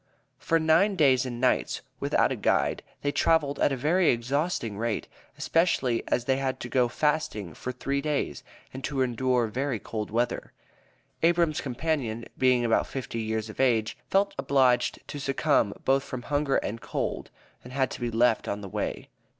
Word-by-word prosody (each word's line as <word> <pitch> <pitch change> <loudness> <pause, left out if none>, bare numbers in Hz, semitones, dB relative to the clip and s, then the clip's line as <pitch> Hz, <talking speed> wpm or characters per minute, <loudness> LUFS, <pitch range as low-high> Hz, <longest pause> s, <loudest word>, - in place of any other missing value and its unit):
For 165 - +2
nine 165 +6 +3
days 135 -6 +4
and 120 -1 -5
nights, 130 0 +1 0.2
without - - +2
a - - 0
guide, - - +1 0.2
they 145 - +1
traveled 145 -2 +2
at - - +3
a 135 - -1
very 165 +7 +3
exhausting 120 - -1
rate, 115 -1 -2 0.3
especially 140 -8 +1
as 120 - 0
they 130 0 +2
had 135 -1 -2
to 120 - -5
go 125 0 +3
fasting 120 - -1
for 125 - -5
three 140 +2 -2
days, 145 - -2 0.3
and 130 +1 -7
to 135 -3 0
endure 125 0 +1
very 125 +3 -2
cold 105 +1 -5
weather. 120 +2 -1 0.7
Abram's 170 -2 +2
companion, 130 -4 -2
being 125 -2 +3
about 115 - +2
fifty 125 -3 -5
years 110 0 -2
of 110 - -11
age, 115 -4 +2
felt 200 +1 +2
obliged 130 -3 +3
to 145 - -6
succumb, 135 -5 +2
both 135 +1 +3
from 130 -3 -6
hunger 145 -1 0
and 115 +3 -2
cold, - - -3 0.3
and 125 - -11
had 130 0 0
to - - -7
be 120 - -1
left 115 0 +2
on 100 - -3
the 100 - -7
way. - - -3
130 Hz, 175 wpm, -27 LUFS, 120-145 Hz, 0.7 s, days